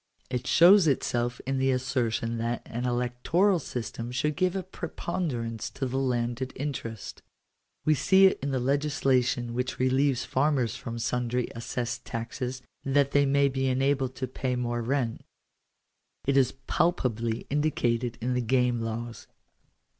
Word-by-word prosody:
It 125 +1 -2
shows 180 +1 +7
itself 120 -3 0
in 135 0 -1
the 135 0 +2
assertion 125 -3 0
that 115 +1 -2
an 120 +2 -4
electoral 125 +11 +1
system 120 -3 -5
should 150 +4 0
give 185 0 +1
a 190 - -2
preponderance 125 - -4
to 135 - -4
the 130 +1 -1
landed 125 0 -1
interest 125 -6 -5 0.6
We 155 - +5
see 190 +6 +5
it 190 - +4
in 140 - -2
the 135 -1 0
legislation 130 -3 +1
which 125 +2 -2
relieves 130 0 +2
farmers 130 -4 +1
from 115 -3 -6
sundry 125 +1 -1
assessed 120 +1 -4
taxes, 125 +2 -5 0.2
that 140 0 +2
they 145 0 +4
may 140 +1 +4
be 135 0 -1
enabled 135 0 +1
to 130 - -3
pay 130 -1 -2
more 120 -1 -1
rent. 120 -1 -1 1.0
It 140 - +2
is 135 -3 +4
palpably 115 -9 0
indicated 120 -5 0
in 125 +2 -1
the 125 - +1
Game 125 0 +2
Laws. 115 +1 -5
125 Hz, 145 wpm, -28 LUFS, 120-140 Hz, 1.0 s, shows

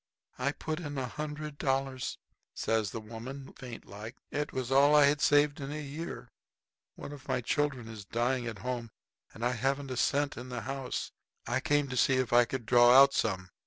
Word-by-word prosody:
"I 140 +3 0
put 155 +2 -4
in 145 -4 -5
a 130 - -1
hundred 150 +2 -6
dollars," 135 -1 -1 0.4
says 110 -2 0
the 115 - -5
woman, 115 +5 -8
faint 125 -3 -9
like. 110 +5 -9 0.2
"It 145 0 -2
was 130 -1 -3
all 140 +2 +6
I 145 -1 +8
had 145 0 +2
saved 145 0 +4
in 140 0 -5
a 150 - -4
year. 150 +4 -6 0.7
One - - -8
of 145 -2 -11
my 130 - +1
children 130 -1 -1
is 110 -2 -8
dying 120 +4 -1
at 115 -2 -5
home 125 -2 -2
now 115 - -26
and 115 - -3
I 125 - +2
haven't 135 +3 -1
a 130 - -3
cent 145 +3 +1
in 125 +1 -7
the 125 - -4
house. 135 -1 -4 0.3
I - - 0
came 145 +1 +1
to 125 - -3
see 130 +2 +4
if 130 -2 0
I 120 0 +7
could 125 -1 -4
draw 120 +1 +7
out 140 0 +7
some. 95 -4 -1
130 Hz, 205 wpm, -31 LUFS, 120-145 Hz, 0.7 s, I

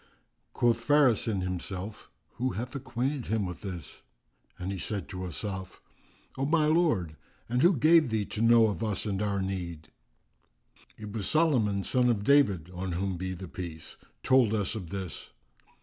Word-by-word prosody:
Quoth 120 -1 +2
Faris 140 -5 +4
in 100 -4 0
himself, 95 +2 -5 0.3
"Who 130 +2 -1
acquainted 130 +2 -3
him 110 -2 0
with 90 -3 -6
this?"; 90 -5 -7 0.6
and 90 +2 -4
he 95 - -4
said 100 +1 -3
to 95 0 -5
Asaf,[FN#361] 95 +1 -5 0.6
"O - - +2
my 155 0 +3
lord, 150 - +2 0.3
and 125 +2 0
who 175 0 +5
gave 155 +1 +5
thee 110 -2 0
to 105 - -5
know 115 0 +6
of 110 +1 -1
us 105 -1 -2
and 100 -2 -2
our 100 -2 0
need?" 90 -4 -5 1.1
"It 105 -1 -8
was 105 -4 -1
Solomon 120 -12 +2
son 125 +3 +2
of 105 -4 +1
David 105 - +3
(on 90 0 -4
whom 95 +2 -1
be 95 +1 -4
the 95 +1 -8
Peace!), 85 -3 -7 0.3
told 130 -5 +4
us 105 -2 -1
of 95 -7 -6
this!" 95 -2 -6
105 Hz, 165 wpm, -29 LUFS, 95-125 Hz, 1.1 s, know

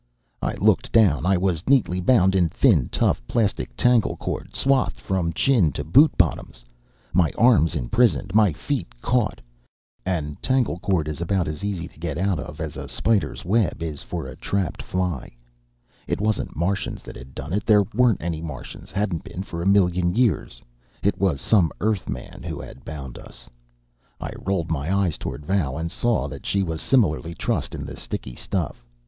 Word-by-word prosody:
I - - -1
looked 110 +4 +2
down. 95 -8 +4
I 95 0 +4
was 90 +1 -1
neatly 115 -10 +3
bound 95 -2 +4
in 90 -3 +3
thin, - - +3
tough, - - +1
plastic 95 - -1
tangle 125 -3 +3
cord, - - -5
swathed 130 - +1
from 85 +5 -1
chin 95 - +3
to 75 - -3
boot 140 - +6
bottoms, 75 -8 0 0.5
my 85 -2 +3
arms 110 -9 +4
imprisoned, 95 - +1
my 105 -3 +5
feet - - -4
caught. 120 - 0 0.6
And 80 -6 -3
tangle 130 -9 +1
cord 85 -5 0
is 75 +1 -4
about 90 +1 0
as 75 +6 -5
easy 95 -5 -2
to - - -19
get 80 -3 -3
out 95 -2 0
of 75 +1 -8
as 80 -2 -4
a - - -6
spider's 110 -5 0
web 100 -3 +1
is 75 -3 -4
for - - -5
a 65 -1 -8
trapped 95 -5 -2
fly. 90 -9 -3 0.7
It - - -1
wasn't 105 -1 -1
Martians 95 +5 -2
that - - -10
had 65 +2 -12
done 75 +6 -5
it. 100 0 0
There 105 -2 +6
weren't 120 -4 +3
any 80 -2 -2
Martians, 75 -7 -8
hadn't 95 -4 -1
been 95 - -6
for 85 -3 -6
a 90 - -1
million 90 -2 +3
years. 115 - 0 0.4
It - - +1
was 90 -7 +1
some 90 - +3
Earthman 100 - -3
who - - -5
had - - -10
bound 70 -5 -7
us. - - -14 0.7
I - - -5
rolled 90 -4 -1
my 80 +2 -1
eyes 90 -6 0
toward 75 - -6
Val, 85 -8 0
and 85 +1 -3
saw 120 +2 0
that - - -8
she 100 -1 +1
was 80 -3 -3
similarly 85 - +2
trussed - - -2
in - - -5
the - - -7
sticky 65 - -6
stuff. - - -3
90 Hz, 180 wpm, -24 LUFS, 80-105 Hz, 0.7 s, boot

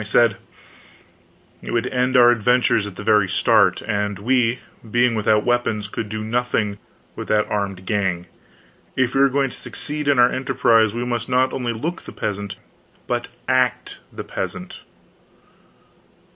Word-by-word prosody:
I - - -4
said: 110 +1 +3 1.2
"It - - -9
would 115 0 +1
end 125 +1 +1
our 120 -1 +7
adventures 120 -2 +2
at 100 - -9
the 100 - -8
very 105 -3 +3
start; - - +3
and 105 -2 -2
we, 120 +3 +1 0.3
being 120 +2 +2
without 105 -1 +2
weapons, 120 -4 0
could 110 0 -5
do 110 0 -4
nothing 110 -3 -1 0.4
with - - -7
that 105 0 +2
armed 100 -3 -3
gang. 95 -4 -1 0.7
If 130 -1 +1
we 135 - +2
are 140 - +5
going 135 0 0
to - - -11
succeed 150 0 -5
in 140 -2 +3
our 125 0 +5
emprise, 115 -5 +2
we 120 +1 -2
must 120 -1 -3
not 130 +1 +2
only 125 -2 -2
look 160 +10 -4
the - - -11
peasant 100 -1 -4 0.5
but - - -2 0.2
act 130 -2 0
the - - -7
peasant." - - -6
115 Hz, 160 wpm, -21 LUFS, 105-125 Hz, 1.2 s, our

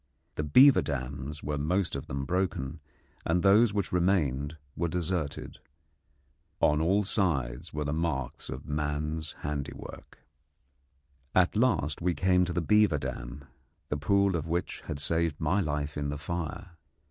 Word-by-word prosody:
The 75 - -3
beaver 130 - +7
dams 70 +1 -4
were 75 0 -2
most 90 +4 0
of 70 +3 -5
them 70 -3 -3
broken, 85 -4 -1 0.4
and 85 +1 +1
those 105 +3 +6
which 100 -2 -2
remained 80 -5 +1 0.2
were 85 - 0
deserted. 85 -3 -3 1.0
On 75 0 +3
all 95 +6 +3
sides 75 - -1
were 75 0 -2
the 70 - -1
marks 80 -6 -2
of 65 +2 -6
man's 75 +1 -2
handiwork. 75 -1 -6 1.2
At 95 +1 +4
last 95 - +1
we 90 0 +1
came 90 -1 +3
to 90 - -3
the 90 - 0
beaver 105 -1 +4
dam, 70 0 -6 0.4
the 75 - -1
pool 100 +5 +2
of 80 -1 -2
which 85 +2 -2
had - - -3
saved 80 +1 0
my 85 +6 +1
life 75 -2 -2
in 70 -1 -2
the 75 - -3
fire. 85 +2 -5
80 Hz, 145 wpm, -29 LUFS, 70-90 Hz, 1.2 s, beaver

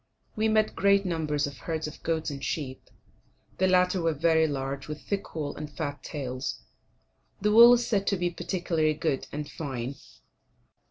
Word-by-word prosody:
We 220 +1 +1
met 215 0 +2
great 200 0 +3
numbers 155 -4 0
of 140 -2 -7
herds 160 -1 -3
of 150 - -8
goats 160 -1 -1
and 140 -1 -7
sheep. 130 -4 -4 0.7
The 190 - +4
latter 180 0 +3
were 165 -2 +1
very 160 +1 +3
large, 135 -1 -4
with 150 0 -5
thick 200 +3 -4
wool 145 -3 -3
and 150 0 -6
fat 145 -3 -4
tails; 130 -3 -4 0.8
the 210 +1 +1
wool 235 +3 +9
is 240 -1 +2
said 200 -4 0
to 195 - +2
be 175 0 0
particularly 165 -4 0
good 150 -3 -1
and 150 0 -4
fine. 130 -5 -4
160 Hz, 170 wpm, -28 LUFS, 145-185 Hz, 0.8 s, wool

